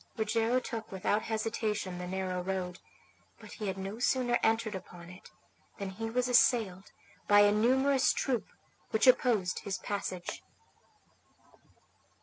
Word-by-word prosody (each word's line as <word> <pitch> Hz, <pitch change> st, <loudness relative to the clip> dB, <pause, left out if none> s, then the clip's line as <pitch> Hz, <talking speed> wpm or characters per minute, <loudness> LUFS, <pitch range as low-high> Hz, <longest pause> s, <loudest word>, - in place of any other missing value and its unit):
Rogero 225 Hz, +3 st, +1 dB
took 230 Hz, -3 st, -6 dB
without 200 Hz, +2 st, 0 dB
hesitation 215 Hz, -4 st, -2 dB
the 180 Hz, -, -5 dB
narrow 185 Hz, -1 st, -2 dB
road; 180 Hz, -1 st, -3 dB, 0.6 s
but -, -, -13 dB
he 215 Hz, -, -5 dB
had 190 Hz, 0 st, -3 dB
no 195 Hz, +3 st, -6 dB
sooner 245 Hz, -1 st, +2 dB
entered 225 Hz, -1 st, +1 dB
upon 175 Hz, -2 st, -9 dB
it 180 Hz, -, -14 dB, 0.5 s
than 195 Hz, -1 st, -5 dB
he 225 Hz, +4 st, -5 dB
was 250 Hz, +2 st, 0 dB
assailed 225 Hz, -6 st, +2 dB, 0.4 s
by 205 Hz, 0 st, +7 dB
a 205 Hz, 0 st, +6 dB
numerous 260 Hz, +5 st, +3 dB
troop 250 Hz, -4 st, -1 dB, 0.4 s
which 220 Hz, -, +2 dB
opposed 235 Hz, -7 st, +3 dB
his 195 Hz, -1 st, -4 dB
passage. 185 Hz, -4 st, -4 dB
210 Hz, 135 wpm, -31 LUFS, 190-230 Hz, 0.6 s, by